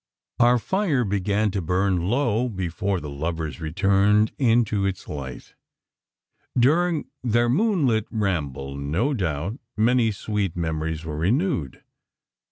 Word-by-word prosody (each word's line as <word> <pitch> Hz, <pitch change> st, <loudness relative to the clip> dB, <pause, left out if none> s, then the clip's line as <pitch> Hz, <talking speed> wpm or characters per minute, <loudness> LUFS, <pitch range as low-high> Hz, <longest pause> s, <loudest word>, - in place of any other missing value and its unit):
Our 120 Hz, +1 st, +5 dB
fire 155 Hz, -, 0 dB
began 100 Hz, +1 st, 0 dB
to 100 Hz, 0 st, -2 dB
burn 90 Hz, 0 st, 0 dB
low, 120 Hz, -1 st, +1 dB
before 95 Hz, -1 st, -2 dB
the 75 Hz, -, -7 dB
lovers 80 Hz, +2 st, -4 dB
returned 100 Hz, +6 st, +3 dB
into 115 Hz, -5 st, +2 dB
its 95 Hz, -2 st, -3 dB
light. 65 Hz, -4 st, -7 dB, 1.0 s
During 160 Hz, +6 st, +3 dB, 0.2 s
their 120 Hz, 0 st, +2 dB
moonlit 140 Hz, -, +2 dB
ramble, 75 Hz, -, -2 dB
no 80 Hz, -, -1 dB
doubt, 95 Hz, -, -2 dB, 0.2 s
many 115 Hz, +1 st, +3 dB
sweet 100 Hz, -3 st, -2 dB
memories 80 Hz, -1 st, -2 dB
were 75 Hz, -2 st, -4 dB
renewed. 100 Hz, -, 0 dB
100 Hz, 115 wpm, -24 LUFS, 80-120 Hz, 1.0 s, Our